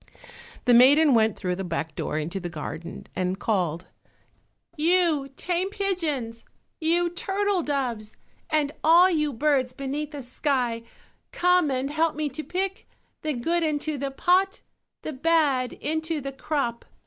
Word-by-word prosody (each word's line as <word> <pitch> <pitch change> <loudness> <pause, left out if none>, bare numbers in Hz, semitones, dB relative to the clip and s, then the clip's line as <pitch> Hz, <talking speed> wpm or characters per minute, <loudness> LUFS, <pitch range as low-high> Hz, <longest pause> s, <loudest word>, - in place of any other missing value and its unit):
The 245 - +5
maiden 280 +5 +7
went 220 -2 +3
through 180 -2 -2
the 195 - -3
back 165 -2 -3
door 150 - -3
into 165 +5 -3
the 175 -2 -5
garden, 165 +1 -7
and 185 +1 -1
called, 180 -6 -1 0.9
"You 320 -3 +2
tame 360 +4 -1
pigeons, 320 - -2 0.4
you 340 +2 +2
turtle 390 +1 0
doves, 250 -8 -2 0.4
and 300 -2 +1
all 345 +4 +7
you 300 -3 +1
birds 265 -1 +1
beneath 275 +2 -4
the 290 -3 -7
sky, 250 -2 -1 0.5
come 360 -3 +3
and 265 +1 -1
help 320 +1 +1
me 305 -1 -1
to 300 +4 -6
pick 380 +3 -3 0.3
"The 305 -1 -1
good 330 +8 0
into 310 -1 -1
the 275 0 -2
pot, 365 +7 +2 0.4
The 310 - -4
bad 280 -4 +2
into 315 +1 -2
the 275 -1 -5
crop." 270 -4 -2
290 Hz, 145 wpm, -25 LUFS, 240-330 Hz, 0.9 s, maiden